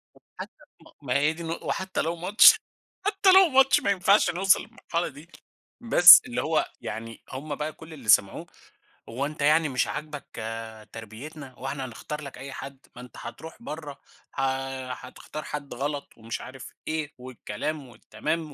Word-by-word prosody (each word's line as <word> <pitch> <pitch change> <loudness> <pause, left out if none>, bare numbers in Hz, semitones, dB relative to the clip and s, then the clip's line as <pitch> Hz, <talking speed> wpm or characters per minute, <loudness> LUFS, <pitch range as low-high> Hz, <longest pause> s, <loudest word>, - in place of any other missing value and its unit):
طَب - - -20 0.2
حتى - - -7 0.3
ما - - -17
ما 130 -1 0
هي 150 +2 +2
دي 170 +1 -9
النق 165 +1 -5
وحتى 190 0 -2
لو 165 +2 -2
ماتش 195 - +7 0.5
حتى 390 -2 +4
لو 380 -2 +7
ماتش 270 0 +5
ما 200 - 0
ينفعش 195 +2 +3
نوصل 190 +2 +3
للمرحلة 170 +1 -4
دي 145 +5 -12 0.5
بس 175 -7 +10
اللي 250 0 -3
هو 155 0 +1 0.2
يعني 115 0 -7
هم 145 +2 -5
بقى 155 +1 -4
كُلّ 160 0 -13
اللي 125 -8 -9
سمعوه، 100 -1 +4 0.6
هو 130 +5 -2
أنت 150 0 -6
يعني 155 +2 +3
مش 130 -1 0
عاجبك 150 -1 -6 0.7
تربيتنا، 130 +6 -10
هو 130 +2 -8
إحنا 135 -1 -4
هنختار 150 +5 -7
لك 140 -3 -9
أي 135 +1 -8
حد، 135 0 -8 0.2
ما 125 - -9
أنت 125 - -13
حتروح 160 - -10
برّه 150 - -8 0.3
ح - - -4 0.5
حتختار 155 - -9
حد 145 -3 -6
غلَط، 140 +3 -5
ومش 115 0 -6
عارف 130 -1 -10
إيه 155 -2 -3
والكلام 130 +3 -6
والتمام 150 +6 -4
150 Hz, 170 wpm, -26 LUFS, 130-165 Hz, 0.7 s, بس